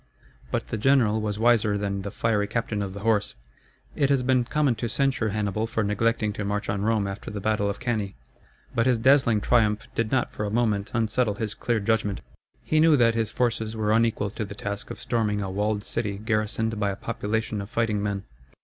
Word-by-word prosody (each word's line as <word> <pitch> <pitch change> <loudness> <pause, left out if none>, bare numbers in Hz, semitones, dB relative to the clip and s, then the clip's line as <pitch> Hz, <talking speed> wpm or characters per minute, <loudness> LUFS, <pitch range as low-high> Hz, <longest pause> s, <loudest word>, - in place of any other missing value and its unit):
But - - -2
the 110 - -3
general 115 -3 +3
was 105 -1 -2
wiser 110 -2 +3
than 100 -1 -2
the 100 - -4
fiery 105 0 0
captain 115 -2 -2
of 95 -1 -4
the 100 - -7
horse. 105 -2 +1 0.6
It 140 -2 +2
has 135 -2 +2
been 125 -1 +2
common 145 0 +2
to 120 - -1
censure 135 -5 +1
Hannibal 105 +1 -1
for 115 -1 -1
neglecting 105 +1 +1
to 105 - -4
march 105 0 -2
on 100 -1 -1
Rome 110 -1 +1
after 100 0 -5
the 105 - -5
battle 105 0 0
of 100 - -4
Cannæ. 110 -5 -2 0.6
But 115 +2 +2
his 125 -2 +4
dazzling 120 -3 +4
triumph 110 -2 +2
did 115 -2 -1
not 130 -2 0
for - - -4
a 105 - -1
moment 105 -3 0
unsettle 110 -1 +1
his 105 0 -3
clear 115 0 -1
judgment. 105 -1 0 0.4
He 155 - +1
knew 160 -1 +6
that 115 -2 +4
his 115 -2 0
forces 115 -2 -1
were 105 -1 0
unequal 110 -3 +2
to 110 - -4
the 100 0 -7
task 100 0 -5
of - - -7
storming 110 -3 0
a 95 -2 -3
walled 105 +1 -1
city 100 -1 -3
garrisoned 110 +1 -1
by 100 -1 +1
a 100 - -2
population 110 0 -2
of 100 - -8
fighting 110 -3 0
men. 100 -1 -2
110 Hz, 210 wpm, -26 LUFS, 105-115 Hz, 0.6 s, knew